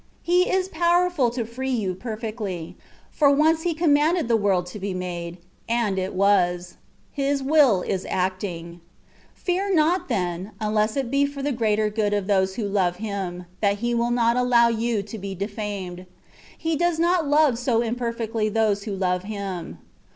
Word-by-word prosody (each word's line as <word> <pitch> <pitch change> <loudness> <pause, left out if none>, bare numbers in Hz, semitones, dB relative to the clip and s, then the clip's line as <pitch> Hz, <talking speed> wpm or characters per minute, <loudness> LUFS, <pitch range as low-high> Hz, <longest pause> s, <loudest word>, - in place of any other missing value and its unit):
He 360 +1 +3
is 375 0 +1
powerful 345 -5 +2
to 235 -1 -3
free 255 +4 -5
you 215 -8 0
perfectly, 215 -5 -5 0.4
for 290 -2 +4
once 315 +3 +3
He 340 -1 -1
commanded 315 -1 +2
the 235 - +3
world 195 -4 +1
to 210 - -7
be 195 -1 -3
made, 175 -1 -5 0.3
and 230 -5 +1
it 185 +1 -3
was 180 -3 +2 0.4
made: 280 - -1
His 275 0 0
willing 270 - +4
is 190 - -2
acting. 180 -2 -3 0.5
Fear 380 +2 -1
not, 340 +2 +2
then, 185 -2 -2
unless 215 +2 0
it 260 -3 -2
be 280 +1 +3
for 280 -1 -7
the 290 - 0
greater 215 -3 +1
good 205 -1 0
of 205 -2 -1
those 190 -1 +1
who 220 - -2
love 190 -3 +1
Him, 190 -3 -5
that 200 -1 +2
he 240 - +1
will 235 0 +1
not 235 -1 +2
allow 245 -1 +4
you 230 -2 -1
to 210 +2 -8
be 195 0 -5
defamed: 200 -2 -5 0.5
He 325 0 -1
does 345 +1 +1
not 340 -1 +2
love 290 -4 +3
so 240 -2 +1
imperfectly 230 -2 -2
those 210 -2 +1
who 205 -3 -3
love 180 -1 0
Him. 195 -5 -5
220 Hz, 175 wpm, -24 LUFS, 195-275 Hz, 0.5 s, for